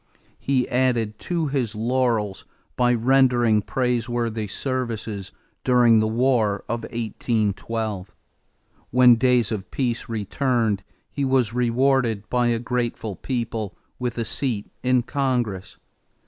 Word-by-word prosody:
He 130 -2 +1
added 120 -4 0
to 170 -3 +1
his 130 -7 -1
laurels 115 -3 0 0.3
by 125 -1 +3
rendering 120 -3 +3
praiseworthy 120 -2 -1
services 115 -5 -4 0.3
during 120 -3 +5
the 110 - +2
war 110 -3 +1
of 115 0 -2
1812. 110 -3 -2 0.8
When 125 0 +7
days 120 -2 +2
of 105 -3 -4
peace 120 -4 -2
returned 115 -1 0 0.3
he 140 - -2
was 130 -4 +2
rewarded 125 -3 +1
by 125 -1 +2
a 120 -1 +2
grateful 120 -3 -2
people 115 -4 -3 0.2
with 125 -2 -3
a 115 - -1
seat 115 -3 -3
in 125 -1 +2
Congress. 120 -8 -2
120 Hz, 115 wpm, -23 LUFS, 110-125 Hz, 0.8 s, When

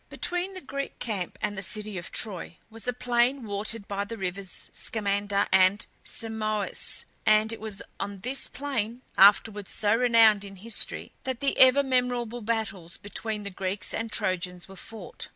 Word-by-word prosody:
Between 360 +2 -1
the 370 - -5
Greek 275 0 -5
camp 200 -6 -3
and 205 -1 -1
the 195 - -4
city 210 +1 -1
of 175 -1 -5
Troy 185 -5 -2
was 225 +2 -5
a - - +3
plain 245 +1 +1
watered 205 +1 -2
by 200 0 -2
the 230 +3 -7
rivers 190 -1 -3
Scamander 205 -1 0
and 190 +2 +5 0.2
Simois, 215 -2 -1 0.2
and 215 +1 +4
it - - -7
was 215 -3 -4 0.2
on 200 -1 -4
this 255 +5 +3
plain, 250 -3 -3
afterwards 205 0 +5
so 210 +1 +2
renowned 230 -4 +5
in 195 -1 -9
history, 215 +4 -1
that 260 -2 -3
the 275 - +1
ever 260 +2 +7
memorable 245 -3 0
battles 210 -6 -3
between 210 +1 -4
the 200 - -5
Greeks 190 +1 -2
and 225 0 -3
Trojans 180 -2 -2
were 195 - -12
fought. 225 +4 -8
215 Hz, 165 wpm, -27 LUFS, 200-240 Hz, 0.2 s, ever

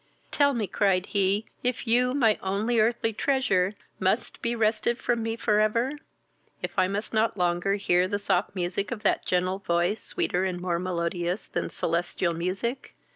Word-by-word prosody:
"Tell 285 -2 +3
me, 225 -3 0
(cried 190 -1 +1
he,) 200 +2 +1 0.2
if 250 +1 -1
you, 250 +2 +2
my 225 -6 +3
only 210 +5 0
earthly 225 0 +1
treasure, 210 -7 +1 0.2
must 190 +5 0
be 235 0 -1
wrested 225 +1 +1
from 240 -2 0
me 225 0 -2
for 210 -2 +1
ever? 230 +5 +2 0.7
if - - -2
I 185 -2 +3
must 205 +4 -4
not 220 0 +1
longer 175 +2 +1
hear 180 -2 +2
the 205 - -1
soft 200 - 0
sound 180 +4 -2
of 220 -3 -5
that - - +1
gentle 185 +1 +1
voice, 175 +3 +1
sweeter 180 +1 -1
and 185 -2 -2
more 175 -1 -1
melodious 175 +1 -2
than - - -3
celestial 170 +1 -1
music? 190 +10 -3
200 Hz, 170 wpm, -27 LUFS, 180-230 Hz, 0.7 s, Tell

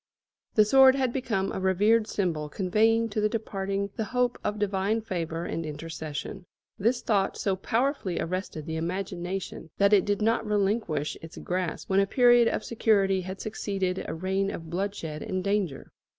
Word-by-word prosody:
The 215 - +6
sword 265 +3 +7
had 260 -3 0
become 220 -8 -1
a - - -3
revered 205 +4 +3
symbol 160 -6 -1
conveying 220 +6 +2
to 215 0 -1
the 210 - +2
departing 200 -3 -3
the 220 - -1
hope 250 +1 0
of 210 - -1
divine 205 +2 0
favour 170 -5 -3
and 165 - -3
intercession. 155 +3 -6 0.3
This 235 +5 +1
thought 200 -3 +1
so 195 -2 0
powerfully 225 - -1
arrested 175 -3 -4
the 160 0 -3
imagination 180 0 -4
that 200 +1 +4
it 195 -3 +6
did 205 -1 0
not 225 +1 +2
relinquish 200 -7 0
its 165 0 -11
grasp 180 -2 -3
when 190 0 +3
a 195 - +3
period 240 0 +5
of 215 - -1
security 200 -4 +2
had 190 +1 -7
succeeded 195 -3 -2
a - - -4
reign 190 +3 -1
of 165 -4 -7
bloodshed 175 -5 -3
and 185 -1 -3
danger. 200 -8 -1
195 Hz, 165 wpm, -27 LUFS, 180-215 Hz, 0.3 s, sword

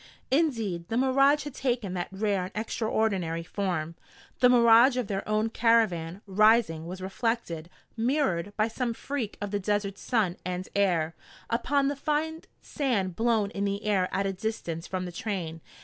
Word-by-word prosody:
Indeed, 225 - 0
the 225 - 0
mirage 275 +3 +4
had 290 -2 -7
taken 240 -8 -1
that 175 -1 -2
rare 195 -1 0
and 185 - -8
extraordinary 215 -6 -1
form. 170 -3 -2 0.5
The 250 - +6
mirage 240 +1 +6
of 250 - 0
their 195 -1 -2
own 215 +1 +1
caravan, 205 -7 +2
rising, 205 -5 +3
was 185 +1 -7
reflected, 190 -5 -2 0.3
mirrored, 225 - 0
by 215 0 +3
some 235 0 -2
freak 260 -6 -4
of 205 -1 -4
the 205 - 0
desert 200 0 -1
sun 210 -8 0
and 180 +1 -4
air, 175 -5 +2 0.4
upon 275 +4 +1
the 285 - 0
fine 310 +3 -1 0.2
sand 205 - -1
blown 220 -1 +1
in 200 - -3
the 200 +1 -2
air 195 -3 +2
at 195 - 0
a 195 - -1
distance 185 -5 -4
from 185 -1 -3
the 180 - -6
train. 170 -4 -4
210 Hz, 165 wpm, -28 LUFS, 185-235 Hz, 0.5 s, The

